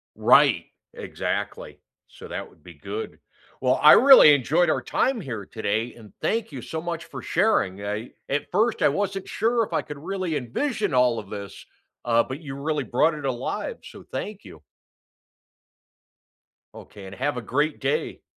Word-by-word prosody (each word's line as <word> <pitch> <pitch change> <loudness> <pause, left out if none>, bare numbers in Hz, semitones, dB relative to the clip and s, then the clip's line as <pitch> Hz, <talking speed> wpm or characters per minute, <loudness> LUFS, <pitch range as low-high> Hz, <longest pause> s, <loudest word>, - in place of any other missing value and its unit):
Right! - - +4 0.3
Exactly. - - -5 0.3
So, - - -13
that - - -6
would - - -25
be - - -12
good. 440 +1 -7 0.4
Well, - - +2
I - - +9
really 265 - +9
enjoyed 155 +6 +2
our - - +1
time 260 -5 0
here 110 - -6
today 110 +2 -2
and 110 -3 -15
thank 225 -4 -1
you 130 -4 -7
so 160 0 -5
much 170 -1 -5
for - - -9
sharing. 100 - +1
I 105 +3 -4 0.2
at 140 +1 -2
first, 220 +5 +1
I - - +5
wasn't 195 -1 -3
sure 230 +2 +1
if 205 - -7
I - - +1
could 145 -1 -9
really 185 -1 -3
envision 185 - -2
all 125 -2 +3
of 105 -2 -11
this, 100 -1 -8 0.4
uh, 115 -1 +3
but 130 +4 -7
you 135 -4 -7
really 145 0 -2
brought 150 +7 +2
it 150 -2 -7
alive, 130 - -3
so - - -12
thank 210 -1 -5
you. 80 - -13 2.1
Okay, 100 -2 -12
and 95 - -9
have 140 +3 -1
a 125 - -4
great 145 +7 -1
day. 465 - -2
145 Hz, 170 wpm, -24 LUFS, 120-195 Hz, 2.1 s, I